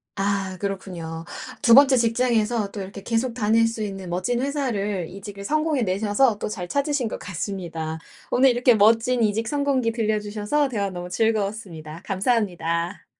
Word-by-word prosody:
아 195 -1 -1
그렇군요. 180 -5 -5 0.4
2 235 - +5
번째 275 +1 +8
직장에서 230 -3 +1
또 205 - -6
이렇게 195 +1 -8
계속 230 +3 0
다닐 225 0 +3
수 225 -1 -4
있는 195 -3 -5
멋진 210 +8 -1
회사를 215 - -1
이직을 200 +1 -9
성공해 305 -1 +1
내셔서 205 +4 +2
또 - - -3
잘 190 -5 -5
찾으신 280 +2 0
것 - - -5
같습니다. 170 -4 -5 0.3
오늘 265 +2 +5
이렇게 245 0 +4
멋진 225 +4 +4
이직 220 +1 0
성공기 280 -4 +1
들려 220 -2 0
주셔서 210 +8 0
대화 205 -6 -2
너무 180 -1 -6
즐거웠습니다. 195 -7 -2
감사합니다. 185 -4 -1
210 Hz, 355 characters per minute, -24 LUFS, 195-240 Hz, 0.4 s, 번째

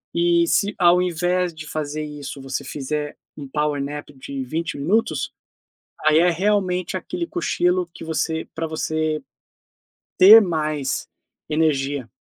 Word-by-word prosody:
e 170 0 +3
se 205 0 +2
ao 175 0 +5
invés 180 0 0
de 155 -1 -9
fazer 155 0 -3
isso 145 -2 -7
você 135 0 -4
fizer 150 +1 -4 0.2
um 140 -2 -7
power 150 0 -1
nap 145 +1 -6
de 135 0 -6
20 160 +6 -3
minutos, 190 +11 0 0.7
aí 155 0 +5
é 175 +1 +4
realmente 185 0 0
aquele 345 - -4
cochilo 180 - 0
que - - -9
você 160 0 -2
pra 165 0 -2
você 155 0 -1 1.0
ter 210 +5 +10
mais 155 -7 -1 0.4
energia. 145 -5 0
160 Hz, 130 wpm, -22 LUFS, 150-180 Hz, 1.0 s, ter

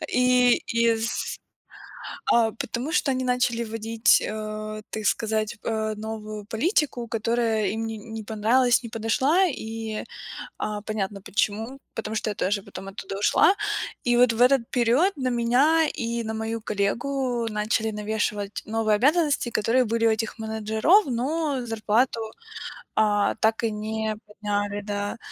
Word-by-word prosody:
И 250 -1 +5 0.2
из 230 0 +1 1.0
А, 225 -2 +4
потому 240 +6 -4
что 310 -5 +2
они 260 0 -1
начали 250 -2 +1
вводить, 225 +1 +2
э, 215 0 -5
ты 215 - -4
сказать, 220 +1 0 0.4
новую 215 -1 -6
политику, 245 - 0
которая 225 -1 0
им 225 +1 -2
не 220 -1 -5
не 220 0 -7
понравилась, 235 +3 +3
не 230 - -6
подошла, 260 - +2
и, 225 -5 -4 0.6
а, 210 -1 -3
понятно 205 -2 -3
почему, 220 +7 -1 0.2
потому 220 0 -4
что 215 0 -1
я - - -3
тоже 200 +1 0
потом 195 - -9
оттуда 195 0 -6
ушла. 210 - +4 0.5
И 240 - +4
вот 245 -1 +5
в 230 +2 +1
этот 265 +1 +6
период 250 +10 +3
на 260 -2 -1
меня 265 +7 +3
и 235 0 -2
на 220 0 -3
мою 220 +1 -3
коллегу 240 +4 -1
начали 215 +1 0
навешивать 210 -1 -2
новые 220 -1 +1
обязанности, 290 +1 +2
которые 235 +4 +2
были 230 0 +1
у - - +5
этих 220 0 -1
менеджеров, 220 - +3
но 275 +3 -1
зарплату, 225 +2 +1 0.8
а, 205 -1 +3
так 220 +1 +2
и 225 - +2
не 215 0 -3
подняли, 205 -1 -2
да. 205 0 -3
225 Hz, 140 wpm, -25 LUFS, 215-245 Hz, 1.0 s, этот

